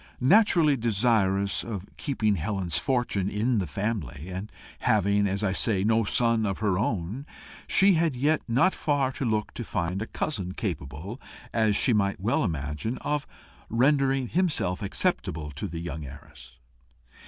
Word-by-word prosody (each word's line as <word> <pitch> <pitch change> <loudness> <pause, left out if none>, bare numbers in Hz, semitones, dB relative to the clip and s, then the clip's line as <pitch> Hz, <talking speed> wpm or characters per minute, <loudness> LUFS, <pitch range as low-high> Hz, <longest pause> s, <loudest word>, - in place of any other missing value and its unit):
Naturally 165 - +5
desirous 105 -4 +1
of 100 -5 -5
keeping 110 -7 0
Helen's 90 0 -1
fortune 120 -8 0
in 110 +3 +1
the 95 - -2
family, 95 -3 -4
and 95 +3 -6 0.3
having, 100 -1 +2
as 100 +2 -2
I 100 - +2
say, 95 0 +1
no 110 +1 +2
son 115 +1 +2
of 100 -3 -1
her 100 -3 0
own, 110 - -2 0.4
she 195 0 +5
had 165 -4 +1
yet 150 +5 +2
not 130 +11 +3
far 140 -3 0
to 135 - -4
look 110 -2 -1
to 120 - -5
find 95 -2 -2
a 110 - -3
cousin 95 -11 -3
capable, 90 - -5 0.3
as 110 -3 +2
she 125 - +3
might 100 -2 +1
well 105 +6 +1
imagine, 80 - -3
of 150 -1 -2 0.4
rendering 135 +1 +2
himself 145 - 0
acceptable 75 -6 -1
to 70 - -5
the 85 +1 -5
heiress. 70 -3 -9
105 Hz, 150 wpm, -27 LUFS, 95-125 Hz, 0.4 s, Naturally